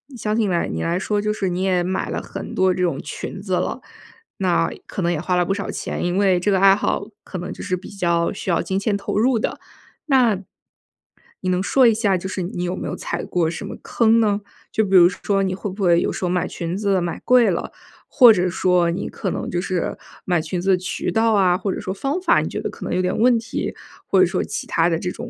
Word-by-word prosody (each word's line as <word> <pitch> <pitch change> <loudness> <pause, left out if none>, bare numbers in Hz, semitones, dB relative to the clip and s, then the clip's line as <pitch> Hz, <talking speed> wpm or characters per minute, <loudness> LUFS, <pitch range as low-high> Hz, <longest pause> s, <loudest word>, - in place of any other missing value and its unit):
相 215 -2 -2
信 220 - +2
你 - - -1
来 170 - 0
你 - - -3
来 170 +1 0
说， 210 +2 -1
就 210 0 0
是 195 -3 -2
你 180 +1 -2
也 185 -2 +2
买 185 +1 -2
了 - - -3
很 - - -7
多 185 0 +3
这 180 - -3
种 170 -6 0
裙 170 +5 -7
子 190 -2 -4
了。 180 - -1 0.6
那 175 -3 +1 0.2
可 - - -4
能 175 0 +1
也 165 - -1
花 180 +1 0
了 180 0 +2
不 195 - 0
少 200 0 -4
钱， - - -4
因 175 +1 0
为 190 -3 +3
这 205 +4 +1
个 190 - +3
爱 195 0 +7
好， 200 - -1 0.2
可 185 - -7
能 180 +1 -5
就 - - -9
是 185 -2 -1
比 180 - -11
较 170 -3 0
需 195 - -6
要 170 - +2
金 190 - -2
钱 200 +1 0
投 200 - -3
入 235 +2 +3
的。 - - -3 0.5
那， 250 -8 +4 1.0
你 185 - -2
能 180 0 +1
说 260 +6 +3
一 230 - +5
下 210 -4 +1
就 180 - -5
是 190 0 -4
你 175 0 -4
有 180 +1 -2
没 - - -5
有 - - -3
踩 - - -4
过 170 -3 0
什 165 - -6
么 - - -6
坑 230 0 +3
呢？ 210 -2 +1 0.3
就 220 - +1
比 195 -1 +1
如 175 -2 +9
说， 195 +1 -1
你 190 -1 -1
会 195 +2 -4
不 195 +2 -5
会 170 -2 +5
有 - - 0
时 - - -3
候 - - 0
买 180 0 0
裙 170 +1 -4
子 200 -2 +1
买 170 -1 -4
贵 245 -4 +5
了， 170 - -3 0.4
或 250 -5 +7
者 180 -2 +1
说 180 -1 +2
你 175 +4 -3
可 195 - -4
能 - - -4
就 175 0 -1
是 185 -3 -2 0.3
买 175 -3 +1
裙 160 +3 -4
子 195 - +2
的 185 - +4
渠 180 0 -3
道 225 0 +2
啊， 185 -3 +3
或 195 - -2
者 - - -5
说 190 - -4
方 275 - -2
法， 370 - +4
你 - - -3
觉 - - -4
得 - - -3
可 - - -10
能 - - -3
有 185 - +2
点 185 0 -1
问 240 +2 +4
题， 225 0 -4 0.3
或 - - +3
者 - - +7
说 - - -1
其 - - -5
他 165 +1 +2
的 165 - +1
这 180 +1 -3
种 240 - -8
190 Hz, 285 characters per minute, -21 LUFS, 180-205 Hz, 1.0 s, 如